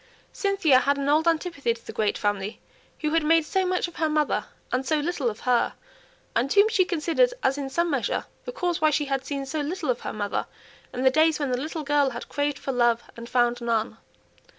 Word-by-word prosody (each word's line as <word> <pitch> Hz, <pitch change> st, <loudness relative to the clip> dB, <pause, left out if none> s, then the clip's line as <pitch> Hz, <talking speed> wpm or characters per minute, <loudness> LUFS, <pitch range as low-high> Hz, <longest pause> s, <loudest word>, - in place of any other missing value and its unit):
Cynthia 395 Hz, -10 st, +3 dB
had 280 Hz, +2 st, +1 dB
an 280 Hz, 0 st, -2 dB
old 310 Hz, +3 st, +3 dB
antipathy 325 Hz, -7 st, 0 dB
to 230 Hz, -, -18 dB
the -, -, -8 dB
great 215 Hz, -2 st, 0 dB
family 205 Hz, 0 st, -2 dB, 0.4 s
who 305 Hz, -1 st, 0 dB
had 330 Hz, -1 st, +3 dB
made 325 Hz, +1 st, +4 dB
so 380 Hz, +3 st, 0 dB
much 365 Hz, 0 st, 0 dB
of 345 Hz, -, -13 dB
her 320 Hz, -1 st, +1 dB
mother 305 Hz, -1 st, +1 dB, 0.3 s
and 255 Hz, +1 st, 0 dB
so 305 Hz, +4 st, +1 dB
little 295 Hz, -5 st, -1 dB
of 215 Hz, -, -8 dB
her; 250 Hz, -1 st, +1 dB, 0.6 s
and 250 Hz, +4 st, +1 dB
whom 405 Hz, +1 st, +6 dB
she 395 Hz, -5 st, +3 dB
considered 350 Hz, +9 st, +2 dB
as 270 Hz, -, +2 dB
in 280 Hz, -2 st, -4 dB
some 340 Hz, +4 st, 0 dB
measure 270 Hz, -4 st, -1 dB, 0.2 s
the -, -, -4 dB
cause 355 Hz, -10 st, -2 dB
why 310 Hz, -, +5 dB
she 295 Hz, 0 st, 0 dB
had 270 Hz, -1 st, -1 dB
seen 275 Hz, 0 st, -4 dB
so 305 Hz, +3 st, -3 dB
little 305 Hz, -1 st, -1 dB
of 240 Hz, -, -3 dB
her -, -, -4 dB
mother 205 Hz, -1 st, -2 dB, 0.4 s
in 250 Hz, -, -3 dB
the 260 Hz, -, +5 dB
days 315 Hz, +2 st, +3 dB
when 285 Hz, -3 st, -1 dB
the 250 Hz, 0 st, -1 dB
little 315 Hz, +1 st, -4 dB
girl 290 Hz, -1 st, +2 dB
had 235 Hz, -2 st, -7 dB
craved 290 Hz, -1 st, -1 dB
for 270 Hz, -, -4 dB
love 240 Hz, -2 st, +2 dB
and 235 Hz, 0 st, -9 dB
found 240 Hz, -1 st, +2 dB
none. 230 Hz, -1 st, -1 dB
285 Hz, 225 wpm, -25 LUFS, 250-325 Hz, 0.6 s, whom